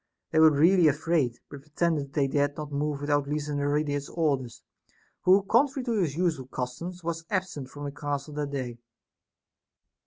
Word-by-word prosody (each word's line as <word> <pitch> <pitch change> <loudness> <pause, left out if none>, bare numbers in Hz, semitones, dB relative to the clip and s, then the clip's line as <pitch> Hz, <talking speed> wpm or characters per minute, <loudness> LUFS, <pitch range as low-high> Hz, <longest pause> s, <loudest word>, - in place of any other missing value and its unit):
They 160 - +3
were 160 0 +8
really 165 +4 +5
afraid, 150 -4 +1
but 145 -1 -10
pretended 150 -1 -1
they 140 -3 +2
dared 145 +1 0
not 150 -1 -6
move 145 0 -2
without 145 -1 +1
Lysanoridas's 145 0 -1
or 160 -4 +2
ders, 125 -3 -10 0.6
who, 190 +2 +6
contrary 260 +6 +2
to 230 -4 0
his 150 -6 -1
usual 160 -7 0
custom, 130 +7 -4
was 165 0 -3
absent 180 -9 -2
from 145 +1 -9
the 140 - -3
castle 145 +1 -4
that 145 -1 -3
day. 125 -4 -4
145 Hz, 160 wpm, -27 LUFS, 140-165 Hz, 0.6 s, were